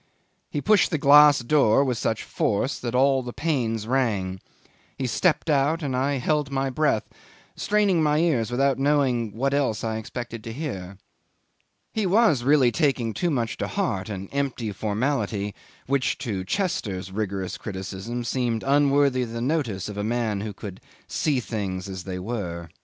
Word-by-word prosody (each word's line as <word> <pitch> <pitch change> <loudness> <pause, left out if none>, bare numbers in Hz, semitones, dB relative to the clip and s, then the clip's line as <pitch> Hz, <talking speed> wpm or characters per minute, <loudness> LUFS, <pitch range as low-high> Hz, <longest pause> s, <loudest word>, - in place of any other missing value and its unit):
He 145 - -3
pushed 210 +1 +4
the 160 - 0
glass 145 0 +7
door 135 -1 +4
with 130 -3 0
such 110 -1 -1
force 110 +7 -1
that 120 0 -3
all 135 +1 +4
the 125 -1 -6
panes 120 -9 -1
rang: 105 -7 0 0.6
he 135 - -2
stepped 160 +8 +1
out, 150 +2 +2
and 135 -3 -1
I 135 +3 +1
held 145 +2 0
my 135 -1 -1
breath, 140 -5 +1 0.5
straining 205 -5 +2
my 150 -1 +2
ears 155 -9 +1
without 135 +2 +1
knowing 135 -6 +2
what 135 +4 0
else 135 -7 0
I 110 -1 -1
expected 115 0 -6
to 115 - -5
hear. 100 - -5 1.0
He 215 -3 0
was 195 - +4
really 135 -2 +4
taking 130 -8 +1
too 175 - 0
much 120 -7 -1
to - - -2
heart 95 +1 -2
an 100 -2 -5
empty 135 -6 -2
formality 105 -1 -1 0.3
which 135 -1 0
to 100 -5 -2
Chester's 100 - -2
rigorous 95 -2 -3
criticism 100 +4 -5
seemed 120 -2 -1
unworthy 140 -2 +3
the 115 -1 -5
notice 120 - -1
of 105 -1 -7
a 105 - -2
man 110 -2 -1
who 105 0 -4
could 100 -1 -9 0.2
see 145 -4 0
things 100 -6 -4
as 95 -2 -7
they 95 -1 -4
were. 90 -5 -4
125 Hz, 165 wpm, -25 LUFS, 105-140 Hz, 1.0 s, glass